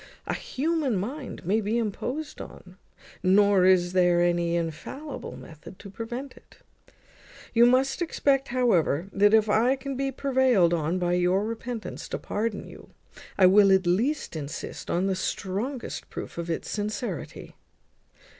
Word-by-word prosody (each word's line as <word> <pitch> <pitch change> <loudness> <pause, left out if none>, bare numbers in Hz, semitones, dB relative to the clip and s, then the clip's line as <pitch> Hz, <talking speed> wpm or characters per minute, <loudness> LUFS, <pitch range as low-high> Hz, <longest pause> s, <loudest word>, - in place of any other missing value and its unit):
A - - -2
human 295 -3 -1
mind 245 - -5
may 210 +5 +2
be 215 +3 -1
imposed 250 +7 -3
on; 180 0 -12 0.5
nor 195 0 +4
is 180 -1 +4
there 175 -1 +4
any 175 -1 +1
infallible 255 - -5
method 160 +2 -12
to 200 - -11
prevent 240 +6 -6
it. - - -20 1.0
You 235 +1 +6
must 265 +5 +2
expect, 275 -5 +1
however, 195 - +1
that 205 +1 +4
if 220 -1 +3
I 230 +5 +3
can 275 0 -6
be 270 +1 -1
prevailed 255 -10 +2
on 165 +2 0
by 175 -1 0
your 180 +3 +2
repentance 230 0 -6
to - - -2
pardon 210 0 -3
you, - - -13 0.5
I 190 - +6
will 195 +1 +6
at 190 -1 +4
least 230 - 0
insist 150 +1 -6
on 180 +2 +1
the 195 - +1
strongest 210 +8 -4
proof - - -7
of 170 0 -4
its 165 - -3
sincerity." 210 +2 -5
205 Hz, 145 wpm, -26 LUFS, 180-255 Hz, 1.0 s, You